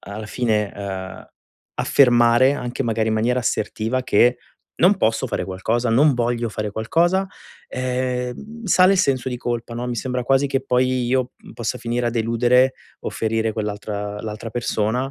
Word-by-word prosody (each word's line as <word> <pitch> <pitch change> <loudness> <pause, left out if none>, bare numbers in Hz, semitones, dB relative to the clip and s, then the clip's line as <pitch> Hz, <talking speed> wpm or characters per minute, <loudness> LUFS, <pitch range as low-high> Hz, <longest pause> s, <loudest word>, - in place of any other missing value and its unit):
alla 105 +1 -8
fine, 105 -4 0
uhm, 95 -2 -6 0.5
affermare 120 0 +4
anche 125 0 -3
magari 115 -2 0
in 110 - +1
maniera 120 +3 +1
assertiva 115 +3 -1
che 120 +1 +3 0.5
non 190 +2 +6
posso 110 0 +1
fare - - -2
qualcosa, 115 +6 -1
non 140 +5 +5
voglio 120 -1 -1
fare 105 -1 -3
qualcosa, 170 - +1 0.4
ehm, 130 - -3
sale 185 0 +5
il 195 - +1
senso 130 -7 +1
di 125 - -3
colpa, 120 -1 -3
no, 120 +1 -4
mi 120 - -3
sembra 125 +1 -2
quasi 135 +2 +3
che 135 -1 -1
poi 125 0 +1
io, 130 0 0
mhmm, - - -15
possa 115 - -3
finire 120 +1 -2
a - - +1
deludere 120 +3 +2 0.3
o - - -4
ferire 110 0 -1
quell'altra 105 -1 -4
l'altra 110 +1 -6
persona, 120 +2 -1
120 Hz, 165 wpm, -21 LUFS, 110-130 Hz, 0.5 s, non